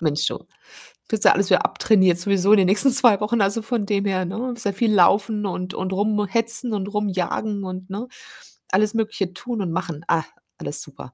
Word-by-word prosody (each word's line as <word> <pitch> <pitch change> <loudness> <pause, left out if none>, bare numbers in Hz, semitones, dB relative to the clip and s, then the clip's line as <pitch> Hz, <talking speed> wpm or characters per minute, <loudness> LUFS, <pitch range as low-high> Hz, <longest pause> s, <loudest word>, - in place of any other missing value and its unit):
Mensch, 155 -1 0
du. - - -2 0.7
Kriegst 220 -2 -1
du - - +8
ja - - +6
alles 200 -1 0
wieder - - +3
abtrainiert 190 -5 +2
sowieso 195 +1 +1
in - - +6
den 190 - +3
nächsten 215 +8 +5
2 240 -6 +6
Wochen, 215 +1 0
also 200 +3 +1
von 225 -1 -2
dem 200 0 -1
her, 185 -2 -1
ne? 230 +7 -4
Sehr 205 -3 -3
viel 220 +2 0
laufen 205 +3 +2
und 180 0 -4
und 190 0 -3
rumhetzen 220 +3 -1
und 200 -1 -3
rumjagen 205 0 -3
und 185 0 -7
ne, 215 +6 -5 0.6
alles 210 +3 +2
Mögliche 210 -4 -2
tun 235 +3 -5
und 175 -4 -3
machen. 165 -3 -4
Ah, 165 -2 +1 0.3
alles 145 0 -4
super, 140 -3 -10
200 Hz, 200 wpm, -22 LUFS, 185-215 Hz, 0.7 s, du